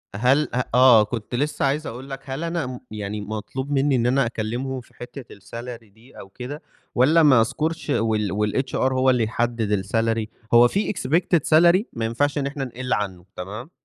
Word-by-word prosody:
هل 130 +7 +3
أ 125 +1 +1
آه، 125 -4 +7
كنت 115 +2 -5
لسه 145 +3 -1
عايز 145 +3 -1
أقول 130 +4 -8
لك، 135 -1 -5
هل 135 +4 -5
أنا 165 -2 -2
م 125 -1 -7
يعني 105 0 -5
مَطلوب 110 +6 -5
مني 140 0 +2
إن 120 -1 +1
أنا 130 +1 +3
أكلمهُم 120 +4 -3
في - - -23
حتّة 125 0 -10
الsalary 115 +4 -9
دي 115 +4 -17
أو 95 - -11
كده؟ 130 +8 -8 0.3
والَّا 155 +7 +5
ما 130 -6 +6
أذكرش 155 +6 -2
وال 105 +1 0
الHR 130 - -8 0.2
هو 130 0 +3
اللي 125 -3 +3
يحدّد 110 -3 -1
الsalary؟ 115 +1 0 0.3
هو 120 +1 +8
في 200 - -1
expected 170 +3 +1 0.2
salary 175 +4 +5
ما 115 -1 -3
ينفعش 145 +6 0
إن 140 - -1
إحنا 140 0 -4
نقِلّ 125 +1 -4
عنه، 95 -4 -3
تمام؟ 105 - -7
125 Hz, 185 wpm, -23 LUFS, 110-140 Hz, 0.3 s, هو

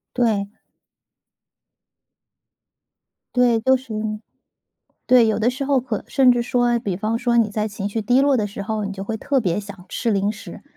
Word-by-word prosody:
对。 215 -5 +1 2.8
对， 240 -2 +3
都 260 +3 +4
食 250 -4 -8
用， 215 0 -3 0.8
对， 245 -2 +5
有 220 - +1
的 230 +3 +3
时 260 +2 -4
候 275 -2 +2
可 235 -4 -4
甚 265 -3 +4
至 240 -1 +2
说， 240 0 +1
比 195 -5 -3
方 220 +3 -1
说 235 -1 +1
你 225 -3 +3
在 215 +1 -1
情 205 -1 -4
绪 220 +2 -3
低 245 +5 +3
落 280 -1 +3
的 210 -2 0
时 200 0 -7
候， 215 0 -3
你 200 - -4
就 195 - -6
会 220 +3 -3
特 270 +5 0
别 180 -4 0
想 200 -3 -9
吃 230 -3 -1
零 200 +1 +1
食， 215 - -10
225 Hz, 195 characters per minute, -21 LUFS, 205-245 Hz, 2.8 s, 对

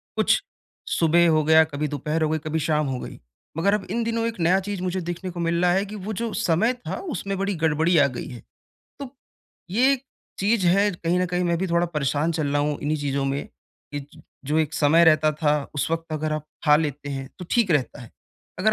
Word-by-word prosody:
कुछ - - +3 0.5
सुबह 170 +1 +3
हो 155 -1 +3
गया, 160 +1 +6
कभी 150 -1 -3
दोपहर 150 +3 -2
हो 155 - +1
गई, 160 - 0
कभी 155 +1 -2
शाम 150 -1 0
हो 130 -2 -3
गई। - - -8 0.4
मगर 195 +5 +2
अब 210 - -1
इन 230 +2 0
दिनों 230 0 -1
एक 230 -3 -5
नया 175 +3 +3
चीज़ 200 -1 -5
मुझे 185 0 -2
देखने 175 +2 -5
को 175 - -8
मिल 170 0 0
रहा 180 0 +4
है 195 +2 +1
कि 210 +1 -8
वो 210 +1 -5
जो 230 +2 -3
समय 220 +3 +1
था, 245 -1 -6
उसमें 200 - -4
बड़ी 195 +1 -1
गड़बड़ी 160 +1 +2
आ 145 -2 +5
गई 125 -3 -6
है। 120 - -9 0.6
तो 275 -3 -6 0.6
ये 245 +8 +4
एक 270 -1 -3 0.3
चीज़ 200 -1 +2
है। 200 +4 +4
कहीं 170 0 -1
न 185 - +1
कहीं 180 0 -1
मैं 170 -1 +1
भी 190 - -1
थोड़ा 170 0 +1
परेशान 150 0 -1
चल 155 -2 -1
रहा 145 +1 +1
हूँ 150 0 -1
इन्हीं 150 +1 -1
चीज़ों 140 -1 -1
में 135 +1 -2 0.5
कि 145 - -3
ज - - -16 0.2
जो 150 +3 +1
एक 160 0 0
समय 160 +3 +4
रहता 155 -1 +5
था 150 0 +1 0.2
उस 145 - -1
वक़्त 165 0 -3
अगर 155 0 -2
आप 155 -1 -3 0.2
खा 150 -2 +6
लेते 145 -2 -3
हैं, 135 -1 -5
तो 180 - -7
ठीक 230 -6 +2
रहता 145 -3 0
है। 115 - -13 0.5
अगर 215 +4 +3
165 Hz, 235 wpm, -24 LUFS, 150-190 Hz, 0.6 s, गया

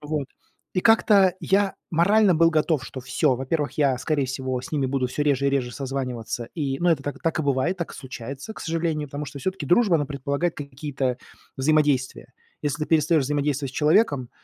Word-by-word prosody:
вот. 150 -2 -3 0.5
И 185 - +2
как-то 205 -4 +5
я 195 0 +1 0.2
морально 195 +4 +4
был 165 +1 +5
готов, 155 -3 +1
что 130 - -7
всё, 130 +1 +1
во-первых, 145 +3 -2
я, 135 -4 +1
скорее 150 0 0
всего, 130 0 -3
с - - -10
ними 140 -3 +1
буду 130 -1 0
всё 135 +4 -2
реже 140 -2 +1
и - - +3
реже 130 -3 0
созваниваться. 125 -4 -4
И, 140 -4 -2
ну, 175 - +2
это 155 -4 +1
так 145 +1 -4
и - - -16
так 165 +1 -1
и - - -1
бывает, 140 +5 0
так 170 -3 -5
и - - -10
случается, 135 - -8
к - - -10
сожалению, 165 -2 -1
потому 145 +1 -5
что 140 +1 -8
всё-таки 185 0 -3
дружба, 185 - +4
она 145 -2 -1
предполагает 140 +4 -2
какие-то 140 -2 -3 0.4
взаимодействия. 140 -3 +1 0.3
Если 150 +1 -2
ты - - -13
перестаешь 155 -1 +3
взаимодействовать 145 -1 -1
с - - -19
человеком, 150 - +2
145 Hz, 200 wpm, -24 LUFS, 135-165 Hz, 0.5 s, как-то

